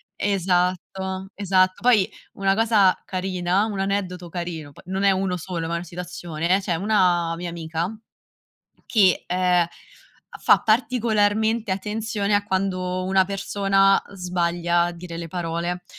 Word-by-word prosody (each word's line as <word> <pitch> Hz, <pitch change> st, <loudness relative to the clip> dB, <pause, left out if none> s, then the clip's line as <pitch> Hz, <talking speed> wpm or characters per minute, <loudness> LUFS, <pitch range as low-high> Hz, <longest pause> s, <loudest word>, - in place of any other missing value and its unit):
esatto, 190 Hz, 0 st, -1 dB
esatto 185 Hz, -2 st, +2 dB
poi 220 Hz, -6 st, +4 dB, 0.3 s
una 195 Hz, 0 st, +1 dB
cosa 215 Hz, -4 st, +4 dB
carina, 185 Hz, +1 st, 0 dB
un 210 Hz, -3 st, -4 dB
aneddoto 190 Hz, -3 st, -2 dB
carino 165 Hz, -4 st, -5 dB
poi -, -, -16 dB
non 190 Hz, +1 st, -3 dB
è 200 Hz, -, +5 dB
uno 185 Hz, -1 st, 0 dB
solo 170 Hz, -1 st, -4 dB
ma 165 Hz, -, -3 dB
è -, -, +1 dB
una 170 Hz, -, -5 dB
situazione, 175 Hz, 0 st, -2 dB
c'è 180 Hz, -3 st, -1 dB
una 175 Hz, -3 st, +2 dB
mia 175 Hz, 0 st, -5 dB
amica 165 Hz, +1 st, -3 dB, 1.0 s
che, 195 Hz, -6 st, +3 dB
ehm, 180 Hz, -1 st, +2 dB, 0.6 s
a -, -, -10 dB
fa -, -, +5 dB
particolarmente 220 Hz, -2 st, +1 dB
attenzione 210 Hz, +1 st, -2 dB
a 205 Hz, -, +1 dB
quando 185 Hz, -2 st, -1 dB
una 190 Hz, 0 st, +3 dB
persona 195 Hz, 0 st, +2 dB
sbaglia 175 Hz, -2 st, 0 dB
a 175 Hz, -, -1 dB
dire 170 Hz, -1 st, -8 dB
le 170 Hz, 0 st, -5 dB
parole. 175 Hz, +1 st, -3 dB
185 Hz, 140 wpm, -23 LUFS, 175-200 Hz, 1.0 s, è